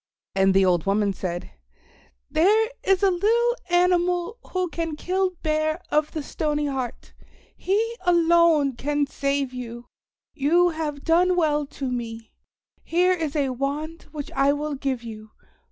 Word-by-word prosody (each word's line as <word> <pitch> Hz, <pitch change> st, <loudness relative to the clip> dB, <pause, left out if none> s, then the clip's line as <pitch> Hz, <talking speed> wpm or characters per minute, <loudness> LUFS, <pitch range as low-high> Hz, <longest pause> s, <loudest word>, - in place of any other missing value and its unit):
And 195 Hz, 0 st, +3 dB
the 195 Hz, 0 st, +5 dB
old 175 Hz, -1 st, +1 dB
woman 200 Hz, 0 st, +2 dB
said, 175 Hz, -2 st, -5 dB, 0.8 s
"There 430 Hz, +7 st, +3 dB
is 385 Hz, 0 st, +2 dB
a 390 Hz, -, +5 dB
little 465 Hz, +6 st, +2 dB
animal 355 Hz, +4 st, +2 dB
who 370 Hz, -1 st, 0 dB
can 330 Hz, -2 st, -4 dB
kill 370 Hz, +3 st, -1 dB
Bear 310 Hz, +1 st, 0 dB
of 300 Hz, 0 st, +1 dB
the 310 Hz, -, -3 dB
Stony 300 Hz, 0 st, -2 dB
Heart. 265 Hz, -4 st, -4 dB, 0.4 s
He 445 Hz, +5 st, 0 dB
alone 335 Hz, -5 st, +4 dB
can 290 Hz, +3 st, 0 dB
save 275 Hz, -1 st, -2 dB
you. 240 Hz, -1 st, -7 dB, 0.5 s
You 335 Hz, +5 st, +3 dB
have 310 Hz, -3 st, -4 dB
done 355 Hz, +2 st, +3 dB
well 300 Hz, -4 st, +1 dB
to 270 Hz, -2 st, -5 dB
me. 230 Hz, -2 st, -5 dB, 0.5 s
Here 360 Hz, +2 st, +2 dB
is 320 Hz, -5 st, -3 dB
a 280 Hz, -3 st, +1 dB
wand 290 Hz, +5 st, -4 dB
which 295 Hz, -3 st, -6 dB
I 275 Hz, +1 st, +3 dB
will 300 Hz, +1 st, -3 dB
give 265 Hz, -3 st, -3 dB
you. 215 Hz, -2 st, -10 dB
305 Hz, 145 wpm, -24 LUFS, 270-350 Hz, 0.8 s, the